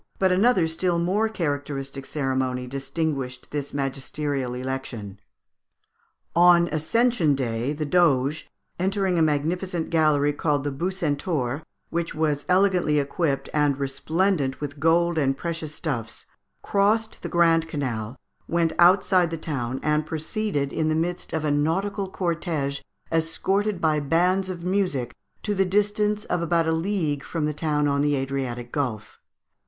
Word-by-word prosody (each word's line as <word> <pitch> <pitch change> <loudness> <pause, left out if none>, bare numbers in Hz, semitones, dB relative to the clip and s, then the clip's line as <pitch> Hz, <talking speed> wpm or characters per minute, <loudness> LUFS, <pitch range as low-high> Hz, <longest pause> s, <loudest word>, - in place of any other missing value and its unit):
But 190 -1 +3
another 190 -2 +4
still 170 +2 0
more 195 +6 +1
characteristic 145 -6 -3
ceremony 130 -3 -1
distinguished 135 -1 -3
this 145 -1 -3
magisterial 135 -1 -2
election. 125 -6 -5 1.2
On 175 0 +6
Ascension 160 - +2
Day, 120 0 -1
the 150 0 -3
Doge, 150 -3 +2 0.3
entering 190 -1 +1
a - - +3
magnificent 165 +3 0
galley, 150 -3 +3
called 145 -2 0
the 145 - -2
Bucentaur, 150 -4 -1 0.3
which 170 -1 -2
was 150 -2 0
elegantly 180 -5 +3
equipped, 140 -1 0
and 145 -2 +2
resplendent 140 +2 0
with 145 -1 -6
gold 165 +2 +3
and 135 -2 +1
precious 165 -2 -4
stuffs, 115 -8 -4 0.4
crossed 215 +2 +1
the - - -5
Grand 165 -2 +3
Canal, 125 -7 -3 0.3
went 170 -1 +1
outside 180 0 +5
the 165 - -4
town, 135 -5 -3
and 150 0 +1
proceeded 155 -2 -2
in 155 0 0
the 155 - +1
midst 175 +2 -2
of 160 -1 -2
a 150 - +1
nautical 190 +7 0
cortége, 165 -6 -2 0.3
escorted 190 +5 0
by 155 -2 +2
bands 180 +6 +2
of 175 -2 -5
music, 180 -10 0 0.3
to 210 - 0
the 195 -1 +2
distance 210 +2 +1
of 175 - -1
about 170 0 +2
a - - +2
league 160 -4 -1
from 165 -3 -2
the 150 - -1
town 150 -1 0
on 140 0 +1
the 145 0 +2
Adriatic 130 -3 -3
Gulf. 120 -8 -3
155 Hz, 140 wpm, -25 LUFS, 140-175 Hz, 1.2 s, On